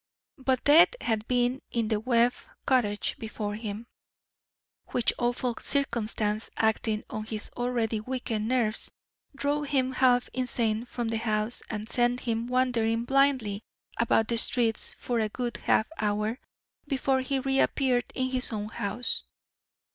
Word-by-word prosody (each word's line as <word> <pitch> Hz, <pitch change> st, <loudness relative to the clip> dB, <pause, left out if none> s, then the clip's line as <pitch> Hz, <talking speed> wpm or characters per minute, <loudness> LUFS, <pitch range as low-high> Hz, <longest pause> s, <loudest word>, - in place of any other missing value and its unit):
But 260 Hz, -1 st, +1 dB
death 320 Hz, +10 st, +7 dB
had 220 Hz, -2 st, -1 dB
been 245 Hz, +1 st, +1 dB
in 230 Hz, -2 st, -1 dB
the 215 Hz, -2 st, +1 dB
Webb 240 Hz, +1 st, +3 dB, 0.3 s
cottage 215 Hz, -6 st, +1 dB
before 215 Hz, -2 st, -4 dB
him, 215 Hz, +1 st, -5 dB, 1.0 s
which 245 Hz, -, +1 dB
awful 245 Hz, 0 st, 0 dB
circumstance, 220 Hz, -5 st, 0 dB
acting 220 Hz, -1 st, +1 dB
on 215 Hz, -, -4 dB
his 220 Hz, -1 st, -4 dB
already 240 Hz, -3 st, 0 dB
weakened 225 Hz, -2 st, -3 dB
nerves, 235 Hz, -3 st, 0 dB, 0.5 s
drove 290 Hz, +1 st, -1 dB
him 260 Hz, -2 st, +1 dB
half 250 Hz, -1 st, +3 dB
insane 235 Hz, -3 st, -1 dB
from 240 Hz, -1 st, -3 dB
the 225 Hz, -1 st, -1 dB
house 215 Hz, 0 st, 0 dB
and 215 Hz, -1 st, -4 dB
sent 245 Hz, +1 st, +1 dB
him 230 Hz, -1 st, -2 dB
wandering 240 Hz, -2 st, +1 dB
blindly 260 Hz, -7 st, +2 dB, 0.4 s
about 225 Hz, -1 st, +3 dB
the 235 Hz, -1 st, +2 dB
streets 230 Hz, -2 st, +2 dB
for 240 Hz, -2 st, -1 dB
a 215 Hz, -1 st, 0 dB
good 240 Hz, +1 st, -3 dB
half 220 Hz, -, +2 dB
hour 210 Hz, +3 st, 0 dB, 0.5 s
before 270 Hz, -1 st, +1 dB
he 270 Hz, +1 st, -1 dB
reappeared 265 Hz, -1 st, +1 dB
in 260 Hz, 0 st, -1 dB
his 255 Hz, 0 st, 0 dB
own 210 Hz, -1 st, -3 dB
house. 215 Hz, +3 st, -2 dB
235 Hz, 140 wpm, -28 LUFS, 220-255 Hz, 1.0 s, death